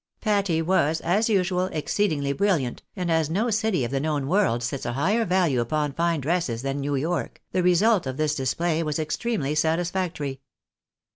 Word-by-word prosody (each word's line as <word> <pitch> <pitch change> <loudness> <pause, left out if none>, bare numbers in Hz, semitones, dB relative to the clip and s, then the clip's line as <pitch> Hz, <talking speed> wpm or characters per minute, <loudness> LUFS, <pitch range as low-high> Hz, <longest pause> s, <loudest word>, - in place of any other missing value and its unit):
Patty 200 -7 +1
was, 160 -3 +2
as 205 +7 +1
usual, 185 -3 +1
exceedingly 155 -4 -1
brilliant; 170 -10 0
and 180 -2 -2
as 160 -2 +2
no 215 +8 0
city 215 - +1
of 120 - -5
the 135 - 0
known 145 -1 -1
world 170 - +2
sets 125 +3 -3
a 120 - -2
higher 205 - +1
value 170 -9 +2
upon 150 +4 -1
fine 170 0 0
dresses 135 -6 -1
than 135 +1 -2
New 140 +1 -1
York, 150 -1 -2
the 185 - +1
result 180 0 +3
of 130 0 -4
this 155 -1 +1
display 155 +4 0
was 150 -2 -1
extremely 155 - -1
satisfactory. 160 -3 -1
160 Hz, 170 wpm, -25 LUFS, 140-185 Hz, -, result